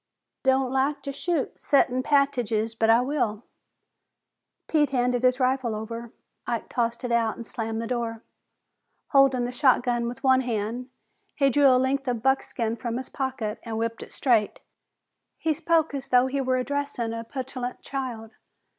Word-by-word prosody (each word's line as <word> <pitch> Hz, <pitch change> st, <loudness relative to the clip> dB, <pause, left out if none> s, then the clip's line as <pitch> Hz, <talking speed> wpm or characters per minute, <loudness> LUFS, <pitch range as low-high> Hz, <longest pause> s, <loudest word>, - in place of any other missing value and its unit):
"Don't 265 Hz, -1 st, +2 dB
like 275 Hz, +1 st, 0 dB
to 280 Hz, -, -4 dB
shoot 305 Hz, +1 st, -2 dB
settin' 255 Hz, -3 st, +2 dB
pat'tidges, 250 Hz, -6 st, +1 dB
but 225 Hz, 0 st, +1 dB
I 230 Hz, +2 st, +6 dB
will." 250 Hz, -5 st, -1 dB, 1.2 s
Pete 300 Hz, -2 st, +2 dB
handed 250 Hz, -2 st, +1 dB
his 255 Hz, +1 st, +3 dB
rifle 255 Hz, -3 st, +1 dB
over. 230 Hz, +2 st, -6 dB, 0.4 s
Ike 235 Hz, -2 st, -2 dB
tossed 235 Hz, 0 st, -1 dB
it 245 Hz, -, -2 dB
out 230 Hz, -1 st, +2 dB
and 235 Hz, -, -8 dB
slammed 225 Hz, 0 st, -4 dB
the 230 Hz, -, -3 dB
door. 230 Hz, -2 st, -3 dB, 0.9 s
Holding 275 Hz, -4 st, +4 dB
the 245 Hz, -, -3 dB
shotgun 245 Hz, -2 st, +2 dB
with 250 Hz, +3 st, -7 dB
one 260 Hz, -1 st, +5 dB
hand, 240 Hz, +1 st, -3 dB, 0.5 s
he 275 Hz, -2 st, +3 dB
drew 285 Hz, +2 st, +5 dB
a 255 Hz, -1 st, +6 dB
length 265 Hz, +1 st, 0 dB
of 240 Hz, -3 st, -1 dB
buckskin 240 Hz, -4 st, 0 dB
from 235 Hz, 0 st, -3 dB
his 260 Hz, -, -6 dB
pocket 255 Hz, -5 st, -3 dB
and 225 Hz, -2 st, -5 dB
whipped 230 Hz, 0 st, -2 dB
it -, -, -9 dB
straight. 230 Hz, -6 st, +1 dB, 0.8 s
He 320 Hz, -, 0 dB
spoke 320 Hz, 0 st, +1 dB
as 275 Hz, -1 st, -4 dB
though 250 Hz, 0 st, +4 dB
he 270 Hz, +1 st, -1 dB
were 255 Hz, -1 st, +1 dB
addressing 255 Hz, -3 st, -2 dB
a 230 Hz, 0 st, -4 dB
petulant 255 Hz, 0 st, -5 dB
child. 245 Hz, -5 st, -5 dB
250 Hz, 165 wpm, -26 LUFS, 230-270 Hz, 1.2 s, I